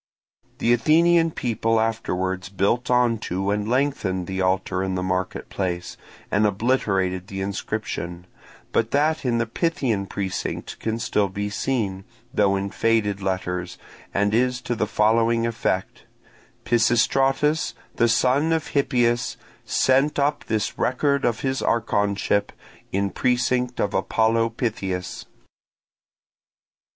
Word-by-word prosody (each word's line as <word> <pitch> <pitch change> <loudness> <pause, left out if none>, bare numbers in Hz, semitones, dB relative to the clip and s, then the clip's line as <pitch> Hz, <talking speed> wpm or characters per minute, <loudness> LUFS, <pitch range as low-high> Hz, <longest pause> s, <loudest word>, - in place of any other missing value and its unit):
The 120 - +3
Athenian 165 +6 +4
people 115 -5 0
afterwards 95 -5 -1
built 100 +5 0
on 125 -2 +3
to 95 0 -2
and 105 +1 -1
lengthened 120 -9 0
the 95 +1 -3
altar 95 0 0
in 95 -1 -1
the 90 - -2
market 95 0 -2
place, 90 -2 -3 0.4
and 105 +1 +3
obliterated 95 -4 0
the 95 -1 -5
inscription; 95 -3 -4 0.5
but 115 - +1
that 155 +4 +1
in 120 -2 +2
the 115 - +1
Pythian 115 - -1
precinct 95 -2 -4
can 110 0 -2
still 105 -3 0
be 100 +2 -4
seen, 100 -5 -1 0.3
though 100 -1 +3
in 100 0 -2
faded 110 -4 +1
letters, 90 -2 -3 0.3
and 105 +1 +1
is 125 +2 +2
to 120 0 -2
the 105 -2 -1
following 115 +2 +2
effect: 110 -5 -2 0.6
Pisistratus, 135 +7 +2 0.2
the 120 - +4
son 130 +6 +3
of 160 -2 -1
Hippias, 120 -4 +1 0.3
Sent 135 +3 +2
up 145 +1 0
this 110 -1 -2
record 140 +2 +1
of 115 -2 0
his 130 -1 -1
archonship 100 -2 +1 0.4
In 100 0 0
precinct 125 +2 0
of 100 - 0
Apollo 115 +3 +2
Pythias. 95 -7 -3
110 Hz, 125 wpm, -23 LUFS, 95-125 Hz, 0.6 s, Athenian